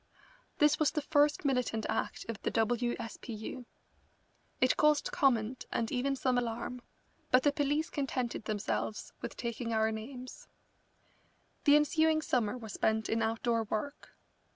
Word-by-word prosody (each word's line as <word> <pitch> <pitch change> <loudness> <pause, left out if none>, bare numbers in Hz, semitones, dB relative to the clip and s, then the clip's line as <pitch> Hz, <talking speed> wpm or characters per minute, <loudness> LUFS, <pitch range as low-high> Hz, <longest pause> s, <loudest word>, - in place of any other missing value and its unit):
This 300 0 +4
was 310 - +4
the 300 - -2
first 295 0 +3
militant 250 -5 0
act - - -2
of 230 -4 -5
the - - 0
W. 240 +2 +1
S. 230 -1 -6
P. 240 - -6
U. 225 +3 -7 0.9
It 255 -2 +4
caused 300 -1 +3
comment 245 -3 +1
and 225 -1 -1
even 270 +2 0
some 255 -2 +1
alarm, 240 +1 -4 0.5
but 255 -1 +5
the 290 - +4
police 290 +3 0
contented 255 -6 -2
themselves 210 0 -2
with - - -6
taking 235 -1 -3
our 220 0 +2
names. 250 +4 -8 1.2
The 290 - +7
ensuing 315 +1 +3
summer 245 -4 0
was 220 -4 -8
spent 220 0 +1
in 225 0 +1
outdoor 225 +1 0
work. 220 +8 -5
245 Hz, 150 wpm, -32 LUFS, 225-285 Hz, 1.2 s, The